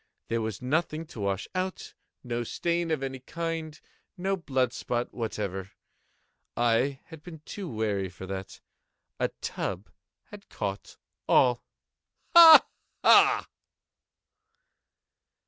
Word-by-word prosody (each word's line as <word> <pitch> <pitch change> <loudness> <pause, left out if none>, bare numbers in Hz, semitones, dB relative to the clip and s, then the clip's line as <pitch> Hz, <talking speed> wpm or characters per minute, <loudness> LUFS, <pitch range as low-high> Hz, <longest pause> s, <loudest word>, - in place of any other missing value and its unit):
There 115 0 0
was 110 +1 -5
nothing 155 +4 -1
to 120 - -12
wash 100 -1 -2
out—no 140 -9 -5
stain 170 +7 -2
of 155 -4 -1
any 135 -1 -4
kind—no 165 +5 -5
blood 130 -8 -1
spot 120 0 -3
whatever. 100 -5 -4 0.9
I 120 +3 +1
had 160 -3 -12
been 160 -2 -11
too 195 -4 -7
wary 105 -4 -2
for 95 +1 -10
that. 95 0 -7 0.6
A - - +2
tub 95 +2 -4 0.4
had 205 -1 -12
caught 100 0 -5 0.3
all—ha! 315 - +5 0.4
ha! - - +6
130 Hz, 100 wpm, -27 LUFS, 110-165 Hz, 0.9 s, ha